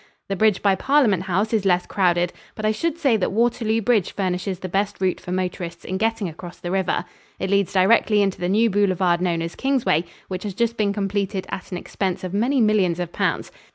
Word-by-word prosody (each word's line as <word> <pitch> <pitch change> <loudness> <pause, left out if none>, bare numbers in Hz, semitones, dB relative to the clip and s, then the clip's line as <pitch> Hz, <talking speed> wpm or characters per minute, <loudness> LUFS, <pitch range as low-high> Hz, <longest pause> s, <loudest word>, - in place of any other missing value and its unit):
The 195 - 0
bridge 215 0 +2
by 200 -1 +4
Parliament 230 - +3
House 200 +5 0
is 215 -3 +2
less 180 -2 +2
crowded, 175 -2 +1 0.2
but 215 - -4
I 215 - +3
should 330 +8 -2
say 275 -9 +3
that 190 - -1
Waterloo 225 0 +1
Bridge 215 -4 +2
furnishes 185 0 -2
the 185 - -6
best 200 +3 -1
route 185 -1 0
for 180 - -7
motorists 180 -2 -3
in 190 +1 -3
getting 225 -2 0
across 175 +2 -9
the 175 - -5
river. 190 -2 0 0.3
It 190 +1 -3
leads 200 -2 +2
directly 205 +2 +4
into 195 -1 -1
the 175 0 -1
new 220 +3 +3
boulevard 185 -3 +2
known 170 -2 0
as 165 - -5
Kingsway, 260 - +1 0.2
which 185 -1 -4
has 200 -2 -5
just 235 +1 0
been 210 -3 +1
completed 200 -1 -2
at 190 - -6
an 180 - -3
expense 185 +1 -3
of 185 0 -4
many 245 +7 +1
millions 200 -6 +2
of 175 -1 -4
pounds. - - -1
195 Hz, 215 wpm, -22 LUFS, 180-215 Hz, 0.3 s, by